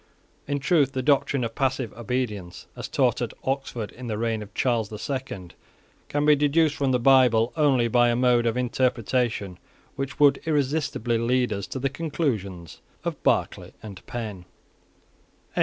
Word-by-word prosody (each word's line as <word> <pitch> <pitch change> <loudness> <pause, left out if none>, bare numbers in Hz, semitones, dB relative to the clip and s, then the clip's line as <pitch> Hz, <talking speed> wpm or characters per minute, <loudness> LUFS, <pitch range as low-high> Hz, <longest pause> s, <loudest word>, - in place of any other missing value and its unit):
In 145 0 0
truth 140 -2 +2
the 130 - -2
doctrine 140 -1 +2
of 115 -1 -3
passive 130 -3 -1
obedience, 110 -6 -4
as - - -6
taught - - +1
at - - -3
Oxford 130 -5 -3
in 125 0 -9
the 110 -2 -2
reign 115 -1 -1
of 105 -1 -9
Charles 115 -5 +1
the 105 - -7
Second, 120 -8 -5 0.6
can 145 0 0
be 150 0 +6
deduced 150 +1 +2
from 135 -2 0
the 125 - +3
Bible 125 -2 +4
only 140 -6 +3
by 120 +1 +4
a 120 - +2
mode 120 -1 +3
of 115 +1 0
interpretation 120 -5 0 0.4
which 135 0 -5
would 145 -1 +5
irresistibly 140 -6 0
lead 125 0 +1
us 100 -1 -4
to - - -5
the 135 +1 0
conclusions 115 - -3 0.2
of - - -4
Barclay - - 0
and 100 -4 -9
Penn. 105 -7 -6
125 Hz, 160 wpm, -25 LUFS, 110-135 Hz, 0.6 s, be